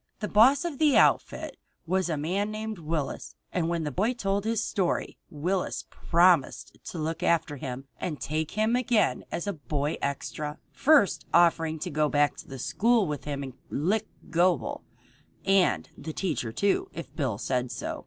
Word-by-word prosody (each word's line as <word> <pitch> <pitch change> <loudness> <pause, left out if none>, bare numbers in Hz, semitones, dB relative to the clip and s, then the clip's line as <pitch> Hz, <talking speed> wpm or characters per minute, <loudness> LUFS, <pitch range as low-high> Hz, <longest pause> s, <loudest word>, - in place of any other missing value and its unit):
The 210 - -2
boss 260 +10 +5
of 315 -6 -4
the 305 -3 +5
outfit - - +2 0.3
was 185 +1 0
a 160 - -1
man 185 +8 -1
named 215 -1 -5
Willis, 155 -3 -3 0.2
and 170 -2 0
when 170 -1 -1
the 150 - -2
boy 220 - 0
told 200 -2 -1
his 225 -1 0
story 190 -5 -1
Willis 180 +5 -2
promised 170 -4 +2
to - - -6
look 160 +1 -3
after 165 -3 +1
him 130 0 -6
and 155 -5 -3
take 155 +1 -2
him 220 +2 +3
again 230 - +2
as 170 - -3
a 200 - -1
boy 145 +1 -2
extra, 150 +2 -3
first 280 - +3
offering 165 -2 +4
to - - -4
go 150 0 +1
back 145 0 +2
to - - -10
the 135 - -8
school 230 - +2
with 150 -4 -4
him 140 -1 -3
and 130 -2 -7 0.2
lick 200 +9 0 0.2
Gobel, 170 -7 +1 0.6
and 195 -1 +3
the 160 - -7
teacher 150 - -2
too, 200 - +1
if 170 - -8
Bill 130 -9 -1
said 125 +2 -1
so. - - -4
170 Hz, 175 wpm, -27 LUFS, 150-205 Hz, 0.6 s, boss